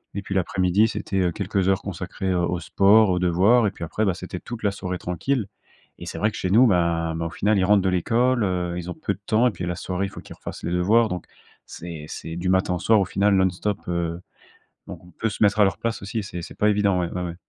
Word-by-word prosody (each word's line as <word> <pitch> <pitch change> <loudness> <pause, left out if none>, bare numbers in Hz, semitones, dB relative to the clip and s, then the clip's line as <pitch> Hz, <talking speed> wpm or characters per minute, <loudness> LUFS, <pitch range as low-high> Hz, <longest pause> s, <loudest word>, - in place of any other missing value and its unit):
Et 100 - -2
puis 100 - -6
l'après-midi, 95 +2 +2
c'était, 100 -3 -3
heu, 90 -2 +2
quelques 95 +2 -1
heures 95 0 +2
consacrées 95 0 -4
au 85 -1 +1
au 90 - -1
sport, 100 +4 +4
aux 90 -1 +1
devoirs, 95 +7 +4
et - - -1
puis - - -9
après, 105 +6 -1
bah, 95 - +2
c'était 90 +1 -7
toute 120 +3 -8
la 100 - +2
soirée 90 -2 -4
tranquille. 100 +7 -2 0.5
Et - - -8
c'est - - -6
vrai 105 - +2
que - - -8
chez 95 - -2
nous, 120 +5 +6
bah 85 -4 +1
bah, 80 0 -3
au - - -2
final, 105 +4 +1
ils 95 - +2
rentrent 100 0 +4
de 95 - +1
l'école, 115 +7 +1
heu, 90 -2 -1
ils 90 0 -5
ont - - -4
peu 100 - -2
de - - -25
temps 110 +4 +3
et - - +1
puis, 90 - -6
la 90 - -2
soirée, 90 +2 -3
il - - -5
faut - - -10
qu'ils - - -12
refassent - - -8
les 85 - -2
devoirs. 105 +6 +3
Donc, 90 -1 -5 0.4
c'est 85 -3 -8
c'est 80 +1 -7
du 90 +2 -2
matin 95 -1 +2
au - - -4
soir, 110 +3 +4
au 100 - +1
final, 100 +3 +1
non-stop. 95 +2 0
Heu 85 -1 -2 0.7
donc, - - -9
on 90 - -16
peut 110 - -3
se 105 - -1
mettre 105 +1 +3
à - - +7
leur 95 - 0
place 115 -1 -3
aussi, 100 +3 -4
c'est 90 -3 -6
c'est - - -10
pas 105 - +3
évident. 100 -3 +2
Ouais 85 - -2
ouais 90 - -3
ouais. 85 -1 -5
95 Hz, 270 wpm, -23 LUFS, 90-105 Hz, 0.7 s, à